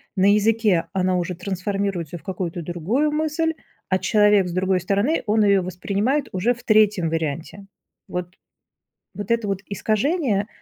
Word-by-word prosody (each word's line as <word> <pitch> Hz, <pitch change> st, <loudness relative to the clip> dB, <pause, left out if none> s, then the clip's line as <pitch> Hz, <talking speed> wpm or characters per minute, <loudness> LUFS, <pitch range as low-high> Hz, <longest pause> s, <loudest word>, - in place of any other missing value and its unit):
на 195 Hz, +1 st, +4 dB
языке 210 Hz, -4 st, +2 dB
она 185 Hz, -1 st, +1 dB
уже 180 Hz, 0 st, -2 dB
трансформируется 190 Hz, -2 st, -3 dB
в 155 Hz, -, -17 dB
какую-то 180 Hz, -2 st, -4 dB
другую 180 Hz, -, -1 dB
мысль, 315 Hz, +1 st, 0 dB, 0.4 s
а 185 Hz, 0 st, +2 dB
человек 210 Hz, -3 st, +4 dB
с -, -, -5 dB
другой 185 Hz, +1 st, +1 dB
стороны, 200 Hz, -, 0 dB
он 215 Hz, +1 st, +3 dB
её 200 Hz, -2 st, +4 dB
воспринимает 200 Hz, -, -1 dB
уже 195 Hz, +7 st, +1 dB
в 240 Hz, -, -15 dB
3 210 Hz, -6 st, +3 dB
варианте. 165 Hz, +4 st, -4 dB, 0.4 s
Вот. 180 Hz, 0 st, -5 dB, 0.8 s
Вот 205 Hz, -1 st, -6 dB
это 230 Hz, -2 st, +1 dB
вот 195 Hz, -1 st, -2 dB
искажение, 215 Hz, -, 0 dB
200 Hz, 145 wpm, -22 LUFS, 180-215 Hz, 0.8 s, на